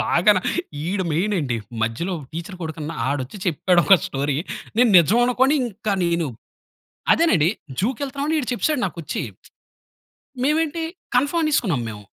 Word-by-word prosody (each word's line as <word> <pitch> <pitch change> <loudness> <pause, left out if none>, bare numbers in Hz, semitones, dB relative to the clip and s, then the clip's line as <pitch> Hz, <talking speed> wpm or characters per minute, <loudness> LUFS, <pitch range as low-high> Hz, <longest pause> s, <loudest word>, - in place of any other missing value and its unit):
బాగాన. 185 +3 +4 0.5
ఈడు 190 +1 -1
మెయినండి. 165 - 0 0.3
మధ్యలో 115 +12 -1
ఒక 145 - -10
టీచర్ 170 +4 -6
కొడుకున్నా, 160 -1 -5
ఆడొచ్చి 140 +6 -3
చెప్పాడు, 175 +1 +3
ఒక 195 - +8
స్టోరీ, 140 +1 -1 0.4
నేను 240 0 +5
నిజం 195 +8 +4
అనుకోని 260 +3 +3
ఇంకా 220 -2 -3
నేను 170 -1 +1 0.9
అదేనండి 175 - +3 0.3
జూకెళ్తున్నాం 270 +6 -2
అని, 320 - +1
ఈడు 250 - -6
చెప్పేసాడు 280 +3 0
నాకొచ్చి. 165 -4 -4 1.2
మేమేంటి, 320 +3 +1 0.3
కన్ఫర్మ్ 290 +6 +1
అనేసుకున్నాం 200 - +1
మేము. 105 -1 -9
190 Hz, 130 wpm, -22 LUFS, 160-250 Hz, 1.2 s, ఒక